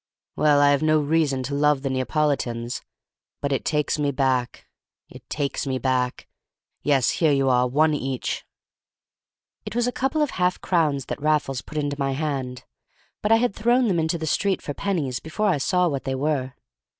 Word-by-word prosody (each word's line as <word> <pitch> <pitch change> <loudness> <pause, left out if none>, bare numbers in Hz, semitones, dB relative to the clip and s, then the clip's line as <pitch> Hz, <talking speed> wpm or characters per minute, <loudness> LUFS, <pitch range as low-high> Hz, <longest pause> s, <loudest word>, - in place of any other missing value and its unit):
"Well, 150 -1 +4
I 145 0 +6
have 140 - +2
no 155 0 +3
reason 145 -3 +1
to 135 +3 -4
love 145 -1 +2
the 135 - -1
Neapolitans; 130 -3 -1 0.6
but 140 - -2
it 135 - 0
takes 150 0 0
me 145 -1 +1
back—it 130 -3 -4
takes 140 -1 -2
me 130 -1 0
back! 130 -1 -1 0.5
Yes, 135 -4 +2
here 160 -3 +2
you 135 -1 +2
are, 125 0 +3
one 155 +5 +3
each." 135 -3 -3 1.2
It 210 +1 -7
was 240 0 +2
a 245 - 0
couple 270 +5 0
of 295 - -1
half 180 0 0
crowns 150 -7 +1
that - - -5
Raffles 150 -4 +1
put 155 - -9
into 145 -1 -2
my 135 -1 0
hand, 135 -4 -3 0.6
but 210 - 0
I - - +8
had 235 -2 +1
thrown 240 +3 +3
them 175 -3 +1
into 160 +1 0
the 160 - -4
street 195 +5 +1
for 145 - -5
pennies 150 -9 -2
before 205 +7 -1
I 155 - +1
saw 180 +5 +2
what 140 -4 -3
they 135 -1 -1
were. 135 -2 -1
145 Hz, 185 wpm, -24 LUFS, 135-160 Hz, 1.2 s, I